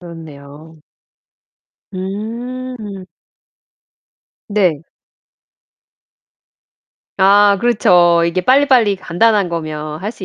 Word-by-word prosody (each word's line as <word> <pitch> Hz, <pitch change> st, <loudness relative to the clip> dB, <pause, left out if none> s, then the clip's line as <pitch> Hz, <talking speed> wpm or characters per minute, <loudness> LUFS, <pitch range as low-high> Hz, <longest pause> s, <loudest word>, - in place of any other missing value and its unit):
그렇네요. 160 Hz, -2 st, -13 dB, 1.2 s
음. 220 Hz, +2 st, -7 dB, 1.4 s
네. 180 Hz, -7 st, 0 dB, 2.3 s
아 200 Hz, +1 st, +4 dB
그렇쵸. 175 Hz, -7 st, +3 dB
이게 175 Hz, +2 st, -1 dB
빨리빨리 255 Hz, -3 st, +3 dB
간단한 195 Hz, +2 st, 0 dB
거면 155 Hz, -1 st, -6 dB
할 210 Hz, -, -3 dB
수 215 Hz, -4 st, -10 dB
190 Hz, 135 characters per minute, -16 LUFS, 170-215 Hz, 2.3 s, 아